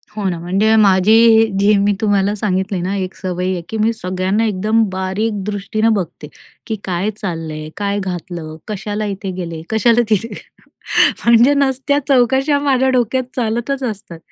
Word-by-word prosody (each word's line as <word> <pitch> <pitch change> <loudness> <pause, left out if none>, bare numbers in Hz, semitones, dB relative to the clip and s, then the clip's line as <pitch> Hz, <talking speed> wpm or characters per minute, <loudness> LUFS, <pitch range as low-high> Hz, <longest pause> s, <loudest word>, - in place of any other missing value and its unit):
हो 210 - -4
ना, 175 - -3
म्हणजे 195 +6 +2
माझी 200 -2 +4
ही 225 0 +6
जी 205 +2 +4
मी 200 +1 +2
तुम्हाला 205 -1 +1
सांगितली 190 -2 -1
ना 185 +3 -2
एक 185 -1 -4
सवय 185 -1 -3
आहे 180 -2 -3
की, 225 - -4
मी 220 +1 +2
सगळ्यांना 185 +2 -1
एकदम 215 +2 +1
बारीक 190 +3 -2
दृष्टीनं 210 +2 0
बघते, 185 -6 -4 0.4
की 220 - -2
काय 185 +2 -1
चाललंय? 160 -6 -5
काय 205 0 -1
घातलं? 175 -4 -6
कशाला 210 +1 -4
इथे 195 -1 -4
गेले? 165 -3 -5
कशाला 230 +2 +3
तिथे? 220 +2 0 0.9
म्हणजे 235 +4 +5
नसत्या 280 0 +1
चौकशा 265 +2 +3
माझ्या 265 -2 +1
डोक्यात 255 +2 0
चालतच 240 +3 -2
असतात. 210 -8 -5
205 Hz, 155 wpm, -17 LUFS, 185-225 Hz, 0.9 s, ही